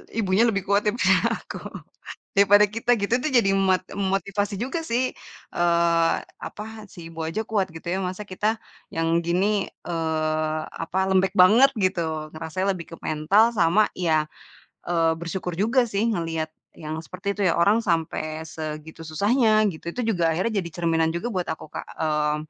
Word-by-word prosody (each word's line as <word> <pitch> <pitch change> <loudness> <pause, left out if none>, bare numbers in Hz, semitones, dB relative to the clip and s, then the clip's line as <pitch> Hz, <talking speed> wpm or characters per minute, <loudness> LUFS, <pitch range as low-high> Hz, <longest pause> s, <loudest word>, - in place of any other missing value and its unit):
ibunya 215 +1 +3
lebih 200 -4 0
kuat 200 +2 +1
daripada 230 +4 +3 0.3
aku. - - -8 0.8
Daripada 205 +1 +6
kita 230 +4 -1
gitu, 200 +3 -1
itu 260 +5 -2
jadi 195 -5 +3
mot 190 -1 +3 0.2
motivasi 200 +1 -1
juga 265 +8 -3
sih, 255 -1 -1 0.4
eee, 170 -1 +3 0.3
apa, 210 - -8 0.3
si 170 -2 -10
ibu 165 -1 -6
aja 165 +7 -2
kuat 195 -5 0
gitu 165 +1 -10
ya, 180 +2 0
masa 185 +3 -5
kita 215 +4 -1 0.3
yang 165 0 -1 0.2
gini, 195 +4 0 0.2
eee, 155 -2 -1 0.2
apa, 170 - -4
lembek 190 0 +3
banget, 210 +8 +6
gitu. 165 -5 -1
Ngerasanya 185 +5 -2
lebih 170 -2 -8
ke - - -7
mental 200 +10 +3
sama 190 +3 +4
ya, 155 -4 +1 0.6
eee, 165 -1 +2
bersyukur 170 +2 -4
juga 230 +7 +2
sih, 220 +1 0
ngelihat 165 -5 -2 0.2
yang 155 0 -6
seperti 200 +4 -5
itu - - -3
ya, 170 - +2
orang 200 +6 +4
sampai 160 -2 -1
segitu 160 0 -7
susahnya, 215 - +3
gitu. 170 0 -7
Itu 250 - -2
juga 170 -5 +1
akhirnya 205 +5 0
jadi 170 -3 -3
cerminan 165 -2 +1
juga 205 +8 -3
buat 185 -5 -2
aku 160 -1 -6
Kak, - - -6 0.2
eee, 150 -1 +1
185 Hz, 165 wpm, -24 LUFS, 165-205 Hz, 0.8 s, Daripada